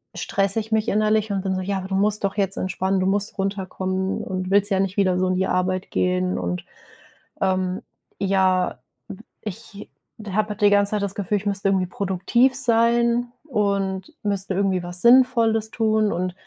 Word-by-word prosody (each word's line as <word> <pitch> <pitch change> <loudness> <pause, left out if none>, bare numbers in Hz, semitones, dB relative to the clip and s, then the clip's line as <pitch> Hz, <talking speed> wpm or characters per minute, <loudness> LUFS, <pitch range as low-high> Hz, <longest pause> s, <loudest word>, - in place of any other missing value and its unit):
stresse 200 +2 -1
ich 220 +1 -12
mich 220 -1 +1
innerlich 215 +1 +1
und 195 - -1
bin 190 0 -2
so: 185 - -2
„Ja, 195 +1 -2
aber 190 0 -7
du 190 - -1
musst 210 +2 +3
doch 195 +1 -1
jetzt 195 -1 0
entspannen, 190 +1 -1
du - - 0
musst 200 +1 0
runterkommen 190 -1 -2
und 185 -1 -4
willst 200 +1 +3
ja 190 - +2
nicht 195 0 -1
wieder 185 -3 +2
so 185 - +1
in 185 - 0
die 190 +1 0
Arbeit 185 +1 -1
gehen“ 180 0 0
und, 90 0 -3 0.8
ähm, 185 -1 0 0.4
ja, 190 -2 +1 0.3
w 190 - -9 0.2
ich 210 0 -9 0.4
habe 215 +2 0
halt 210 0 -6
die 205 - +6
ganze 205 0 +3
Zeit 210 -1 -1
das 200 -1 -2
Gefühl, 205 +1 -1
ich 200 - -7
müsste 200 -1 -1
irgendwie 190 -1 +1
produktiv 200 +8 +1
sein 235 0 +2
und 200 - -1
müsste 195 -2 -1
irgendwie 190 -1 +1
was 175 0 -3
Sinnvolles 235 -3 +4
tun 220 -1 +1
und 180 +1 -2
195 Hz, 185 wpm, -22 LUFS, 185-215 Hz, 0.8 s, die